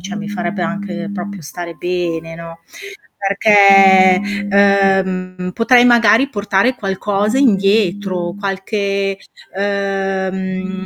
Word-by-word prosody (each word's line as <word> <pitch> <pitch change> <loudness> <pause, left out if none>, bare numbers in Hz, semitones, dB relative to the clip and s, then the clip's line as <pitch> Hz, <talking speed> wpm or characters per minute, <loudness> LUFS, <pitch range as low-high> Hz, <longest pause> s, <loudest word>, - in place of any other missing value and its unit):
cioè 195 +4 -7
mi 205 0 -6
farebbe 185 -2 -4
anche 200 -2 -5
proprio 200 -1 -7
stare 170 +3 -8
bene, 165 -1 -4
no. 165 0 -11 0.6
Perché, 195 -2 +5 0.3
ehm, 190 -2 +1
potrei 245 +1 +4
magari 235 +2 +4
portare 205 +3 0
qualcosa 205 +2 -2
indietro, 195 -5 0
qualche 195 0 -3 0.4
ehm, 190 -1 -3
195 Hz, 95 wpm, -16 LUFS, 185-205 Hz, 0.6 s, Perché